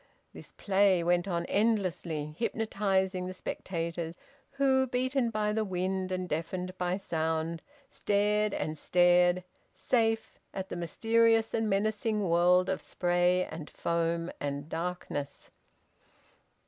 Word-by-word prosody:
This -, -, -11 dB
play 195 Hz, -3 st, +3 dB
went 175 Hz, +2 st, +2 dB
on 170 Hz, -2 st, -1 dB
endlessly, 180 Hz, -9 st, 0 dB
hypnotising 195 Hz, -5 st, 0 dB
the 185 Hz, -, -6 dB
spectators 170 Hz, -2 st, -4 dB, 0.4 s
who, 265 Hz, -1 st, +3 dB
beaten 255 Hz, 0 st, 0 dB
by 210 Hz, -1 st, 0 dB
the 220 Hz, 0 st, +1 dB
wind 185 Hz, -1 st, -2 dB
and 185 Hz, 0 st, -2 dB
deafened 180 Hz, +3 st, -3 dB
by 180 Hz, +1 st, 0 dB
sound, 160 Hz, -2 st, -2 dB, 0.3 s
stared 210 Hz, +1 st, +1 dB
and 155 Hz, -4 st, -3 dB
stared, 175 Hz, +1 st, +4 dB, 0.3 s
safe, 225 Hz, -2 st, 0 dB, 0.2 s
at 190 Hz, 0 st, -4 dB
the -, -, -4 dB
mysterious 225 Hz, +6 st, +2 dB
and 225 Hz, -1 st, 0 dB
menacing 210 Hz, 0 st, 0 dB
world 180 Hz, +2 st, +4 dB
of 190 Hz, -, -1 dB
spray 175 Hz, 0 st, +1 dB
and 155 Hz, -2 st, -7 dB
foam 170 Hz, 0 st, -1 dB
and 145 Hz, +1 st, -4 dB
darkness. 165 Hz, -4 st, -4 dB
185 Hz, 120 wpm, -30 LUFS, 170-210 Hz, 0.4 s, stared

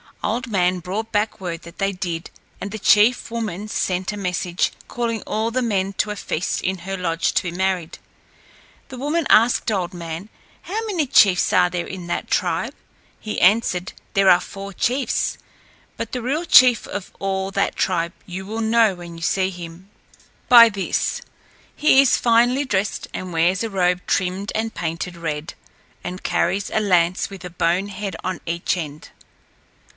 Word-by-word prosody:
Old 235 Hz, +5 st, -1 dB
Man 180 Hz, -2 st, +2 dB
brought 200 Hz, +6 st, -4 dB
back 210 Hz, 0 st, 0 dB
word 175 Hz, -3 st, -5 dB
that 170 Hz, -, -13 dB
they 195 Hz, 0 st, 0 dB
did, 175 Hz, -3 st, -4 dB, 0.3 s
and 200 Hz, -, -5 dB
the 220 Hz, -, -5 dB
chief 215 Hz, +5 st, +4 dB
woman 215 Hz, -4 st, -4 dB
sent 185 Hz, -2 st, -1 dB
a 210 Hz, -, -6 dB
message, 180 Hz, -2 st, -1 dB, 0.2 s
calling 230 Hz, -2 st, -2 dB
all 220 Hz, +2 st, -1 dB
the 255 Hz, +2 st, -1 dB
men 195 Hz, -4 st, 0 dB
to 210 Hz, -, -1 dB
a -, -, -4 dB
feast 180 Hz, -3 st, -2 dB
in 190 Hz, 0 st, -2 dB
her 195 Hz, +3 st, -5 dB
lodge 165 Hz, -2 st, 0 dB
to -, -, +2 dB
be 175 Hz, -, -3 dB
married. 185 Hz, -2 st, -2 dB, 0.9 s
The 260 Hz, -, -8 dB
woman 295 Hz, +5 st, -1 dB
asked 230 Hz, 0 st, +4 dB
Old 185 Hz, -3 st, -1 dB
Man, 170 Hz, +3 st, -6 dB, 0.3 s
"How 410 Hz, +4 st, -3 dB
many 365 Hz, -8 st, 0 dB
chiefs 190 Hz, -7 st, +4 dB
are 180 Hz, -, +5 dB
there 175 Hz, -1 st, -3 dB
in 185 Hz, -2 st, -7 dB
that -, -, -3 dB
tribe?" -, -, 0 dB, 0.4 s
He 215 Hz, -, -4 dB
answered, 185 Hz, -2 st, +3 dB, 0.2 s
"There 195 Hz, -1 st, +4 dB
are 175 Hz, -, +7 dB
four 200 Hz, 0 st, -8 dB
chiefs. 255 Hz, +8 st, 0 dB, 0.6 s
But -, -, -5 dB
the 250 Hz, -, -3 dB
real 285 Hz, +8 st, -1 dB
chief 250 Hz, -7 st, +6 dB
of 200 Hz, -2 st, -6 dB
all 195 Hz, -1 st, -1 dB
that -, -, 0 dB
tribe 170 Hz, -1 st, 0 dB
you 185 Hz, +1 st, -6 dB
will 220 Hz, +3 st, -4 dB
know 220 Hz, -2 st, +3 dB
when 175 Hz, -1 st, -10 dB
you -, -, -11 dB
see 190 Hz, +2 st, +1 dB
him 175 Hz, +1 st, -10 dB, 0.6 s
by 235 Hz, -2 st, +10 dB
this 200 Hz, -3 st, -2 dB, 0.5 s
he 300 Hz, -3 st, +5 dB
is 275 Hz, -, +3 dB
finely 245 Hz, +4 st, +3 dB
dressed 200 Hz, -4 st, -1 dB
and 185 Hz, -1 st, -5 dB
wears 175 Hz, +5 st, +2 dB
a 225 Hz, -, -2 dB
robe 180 Hz, -2 st, +1 dB
trimmed, 190 Hz, +2 st, -1 dB
and 220 Hz, 0 st, -1 dB
painted 170 Hz, +1 st, -4 dB
red, 160 Hz, -1 st, -4 dB, 0.5 s
and 185 Hz, +1 st, -6 dB
carries 200 Hz, +1 st, 0 dB
a -, -, +1 dB
lance 180 Hz, -3 st, +2 dB
with 190 Hz, -2 st, -9 dB
a -, -, -5 dB
bone 175 Hz, +3 st, 0 dB
head 200 Hz, 0 st, -5 dB
on 185 Hz, 0 st, -3 dB
each 170 Hz, +2 st, -1 dB
end." 150 Hz, -3 st, -7 dB
190 Hz, 175 wpm, -21 LUFS, 180-220 Hz, 0.9 s, by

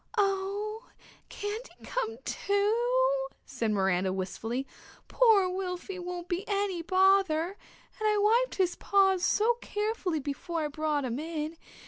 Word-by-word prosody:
"Oh, 405 Hz, +3 st, -1 dB, 0.4 s
can't 420 Hz, +4 st, -5 dB
he -, -, -15 dB
come, 470 Hz, -3 st, -2 dB
too?" -, -, +1 dB, 0.2 s
said 225 Hz, -, -2 dB
Miranda 190 Hz, -2 st, +1 dB
wistfully. 225 Hz, +7 st, -3 dB, 0.4 s
"Poor 440 Hz, -6 st, +5 dB
Wilfy 365 Hz, 0 st, -4 dB
won't 355 Hz, 0 st, -5 dB
be 355 Hz, +2 st, -2 dB
any 400 Hz, -3 st, 0 dB
bother 370 Hz, -2 st, +3 dB, 0.5 s
and 435 Hz, -, +1 dB
I 420 Hz, -, +2 dB
wiped 455 Hz, +5 st, +3 dB
his 365 Hz, -2 st, +1 dB
paws 385 Hz, -2 st, +3 dB
so 465 Hz, +5 st, +3 dB
carefully 415 Hz, -6 st, -1 dB
before 300 Hz, +4 st, -3 dB
I 300 Hz, -, -1 dB
brought 300 Hz, -1 st, -1 dB
him 245 Hz, +1 st, -2 dB
in. 315 Hz, 0 st, -4 dB
385 Hz, 130 wpm, -29 LUFS, 315-425 Hz, 0.5 s, Poor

